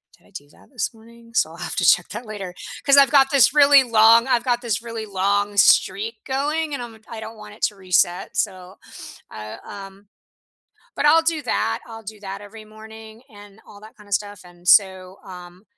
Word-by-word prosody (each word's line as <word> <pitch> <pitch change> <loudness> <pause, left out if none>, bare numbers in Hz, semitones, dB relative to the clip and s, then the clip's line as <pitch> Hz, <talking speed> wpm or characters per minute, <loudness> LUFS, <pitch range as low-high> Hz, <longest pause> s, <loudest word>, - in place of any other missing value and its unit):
"Did - - -28
I - - -25
do 190 -7 -11
that - - -23
this 245 -3 -3
morning?" 230 +1 -19
So - - +1
I'll - - -13
have - - -5
to - - 0
check - - +3
that 240 - -8
later, 195 -4 -7 0.3
'cause 280 - +5
I've 280 -1 +6
got 270 -2 +4
this 280 0 +4
really 285 -1 +7
long 230 0 +4
I've 240 -3 +1
got 245 -1 -1
this 225 -3 -3
really 230 -2 -7
long 200 +1 -1
streak 430 - +2
going 295 +3 -2
and, 250 - -6
um, 225 -2 -12
I 230 - -8
don't 220 +1 -10
want 210 -1 -12
it - - -15
to 210 - 0
reset, 180 -2 0
so 185 0 -4 0.5
I, 105 0 -9
um 195 0 -12 0.9
but - - -1
I'll 320 +2 +5
do 325 -1 -1
that, 245 - -2
I'll 225 -1 -11
do 215 0 -11
that 195 0 -8
every 215 +1 -13
morning 220 +1 -14
and 205 0 -16
all 205 - -15
that 215 +1 -16
kinda 205 -1 -18
stuff, 205 +1 -3
and 175 0 -13
so, 190 -2 +3
um, 180 0 -13
220 Hz, 205 wpm, -21 LUFS, 195-240 Hz, 0.9 s, really